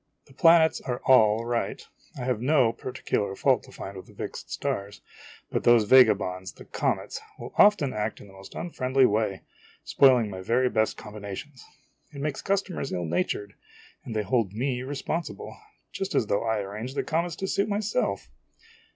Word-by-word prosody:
The 135 - -19
planets 165 +2 +5
are 125 -2 -3
all 110 -3 +5
right; 120 0 -2 0.4
I - - -6
have 125 -3 -1
no 130 -4 +3
particular 110 -5 -3
fault - - +2
to - - -15
find 100 - -8
with 95 - -10
the - - -17
fixed - - -7
stars; 100 +1 -3 0.5
but - - -1
those 120 -2 +6
vagabonds, 100 -6 +4
the - - -14
comets, - - -2 0.2
will - - -9
often 205 -10 +5
act 105 +1 -3
in - - -12
the 100 - -16
most 95 0 -13
unfriendly 135 -6 +1
way, 105 -3 0 0.4
spoiling 125 -6 +4
my 95 -1 -6
very 125 +6 +2
best 110 0 +1
combinations. 105 +5 -8 0.5
It 140 - -9
makes 145 0 -3
customers 195 -7 -2
ill 90 -2 -2
natured, 90 +4 -2 0.5
and 115 - -7
they 105 - 0
hold 105 -2 0
me 125 +2 -2
responsible, 145 +5 -4 0.4
just 195 0 -4
as - - +3
though 100 - 0
I 110 -2 0
arranged 105 +7 -6
the - - 0
comets 165 +1 -1
to 190 - -4
suit 200 +2 0
myself! 210 +1 -1
120 Hz, 170 wpm, -26 LUFS, 105-140 Hz, 0.5 s, those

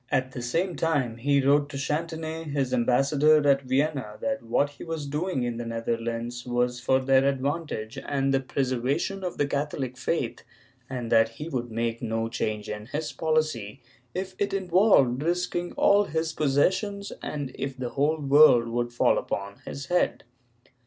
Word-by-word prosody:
At 130 0 0
the 125 - -6
same 165 +9 -1
time 140 -8 0
he 140 +2 +2
wrote 145 +1 +4
to 140 - -6
Chantonnay, 160 +2 -3
his 140 -4 -1
ambassador 140 +5 +3
at 140 -1 +4
Vienna, 130 -4 -1
that 140 0 -2
what 130 +5 +1
he 145 - -11
was 165 -3 -4
doing 150 0 -2
in 120 -1 -2
the 120 - -4
Netherlands 115 +1 -3
was 125 0 0
for 130 +2 +2
their 135 0 +3
advantage 140 -3 -2
and 135 -1 +1
the 135 - +3
preservation 135 +8 -1
of 180 - -4
the 145 - +2
Catholic 140 -2 -3
faith, 130 -1 -2 0.5
and 125 -3 -4
that 115 -1 +5
he 150 - -5
would 120 -5 -3
make 115 0 -2
no 115 -1 -2
change 110 -3 -3
in 105 0 -6
his 150 +4 -3
policy, 155 -8 -1 0.4
if 190 +1 -3
it 200 -1 0
involved 180 - +3
risking 175 +1 -1
all 205 +1 +4
his 160 -1 -2
possessions 190 +8 +1
and 145 -3 -4
if 135 -1 -5
the 125 -1 -3
whole 150 +5 +1
world 140 -3 +6
should 120 0 -2
fall - - +4
upon 100 0 -4
his 140 - -6
head. 180 +5 +1
135 Hz, 165 wpm, -26 LUFS, 120-155 Hz, 0.5 s, world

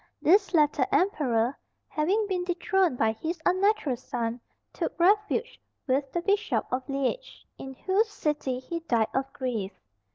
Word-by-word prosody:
This 385 +3 +4
latter 295 -4 +3
emperor, 260 - +2 0.3
having 380 +8 +1
been 375 -3 -1
dethroned 360 -3 +1
by 220 -1 +3
his 320 +10 -4
unnatural 375 - +2
son, 235 -1 -4 0.3
took - - -4
refuge 415 +5 +2 0.2
with 275 0 0
the 345 - -2
Bishop 410 +3 +1
of 255 +2 -2
Liege, 275 - -3
in 265 0 -8
whose 395 - +1
city 295 -9 -2
he 300 +7 -5
died 235 -9 +1
of 270 +1 -1
grief. 225 -8 -3
305 Hz, 140 wpm, -27 LUFS, 255-385 Hz, 0.3 s, This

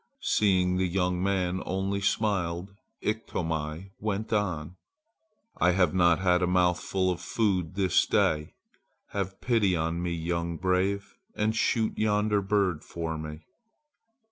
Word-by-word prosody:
Seeing 90 -3 +2
the 95 0 +1
young 90 0 0
man 95 -1 0
only 95 +2 -2
smiled 100 -3 0 0.3
Iktomi 85 -5 -3
went 110 +1 -2
on: 90 -5 -1 0.8
"I 90 +1 +3
have 90 -3 +2
not 85 -3 +4
had 90 -1 +2
a 90 - +2
mouthful 90 +1 +1
of 90 - -4
food 95 -6 0
this 95 -3 +2
day. 75 -1 +1 0.5
Have 95 -1 -4
pity 110 -7 +2
on 80 +1 -1
me, 90 -1 -1
young 85 0 -2
brave, 95 +3 0 0.2
and 110 +1 0
shoot 110 0 +1
yonder 105 -1 +2
bird 100 -4 +1
for 80 -1 -4
me!" 75 0 -7
90 Hz, 130 wpm, -28 LUFS, 85-100 Hz, 0.8 s, not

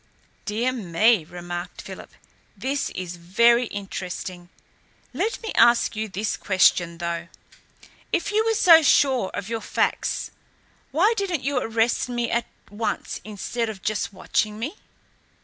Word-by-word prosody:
"Dear 230 +4 0
me," 215 -3 +2
remarked 175 +1 -7
Philip, - - -9 0.5
"this 275 +2 -1
is 180 -1 -5
very 235 +8 +3
interesting. 185 -3 -6 0.6
Let 390 - -1
me 445 - -3
ask 235 -1 +4
you 215 0 -3
this 200 +3 -2
question, 180 -3 +3
though. 170 0 -3 0.8
If 340 - 0
you 430 +1 +3
were 450 0 +1
so 335 -6 +8
sure 265 -8 +3
of 200 - -4
your 225 0 -3
facts, - - -1 0.6
why 375 - +3
didn't 370 -8 -1
you 275 -1 +1
arrest 230 +1 0
me 240 -1 -1
at 235 0 0 0.2
once 215 +2 -3
instead 220 +3 -3
of 205 -3 -8
just 215 -1 -1
watching 210 +2 -1
me?" 285 - -5
225 Hz, 135 wpm, -24 LUFS, 185-255 Hz, 0.8 s, so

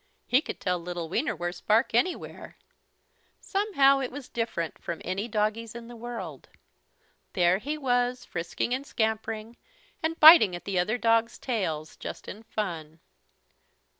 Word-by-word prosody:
He 255 +3 +3
could - - -7
tell 180 -1 -1
little 170 -1 -5
Wienerwurst's 175 - -2
bark 225 +4 +2
anywhere. 245 +11 -1 0.8
Somehow 310 -10 +3
it 265 - -3
was 280 -1 -8
different 225 -8 -3
from 170 -1 -5
any 190 +5 -2
doggie's 215 +1 -1
in 235 -1 -8
the 240 - -10
world. 240 +1 -7 0.8
There 180 0 +3
he 295 +7 -3
was, 245 -2 0
frisking 175 +7 -3
and 260 +2 -2
scampering 220 -2 -2 0.4
and 325 +1 -2
biting 310 - +9
at 175 - -9
the 195 -2 0
other 215 +7 +1
dogs' 230 0 +2
tails, 160 - -3
just - - -8
in 210 - -8
fun. 170 -8 -5
225 Hz, 140 wpm, -27 LUFS, 180-245 Hz, 0.8 s, biting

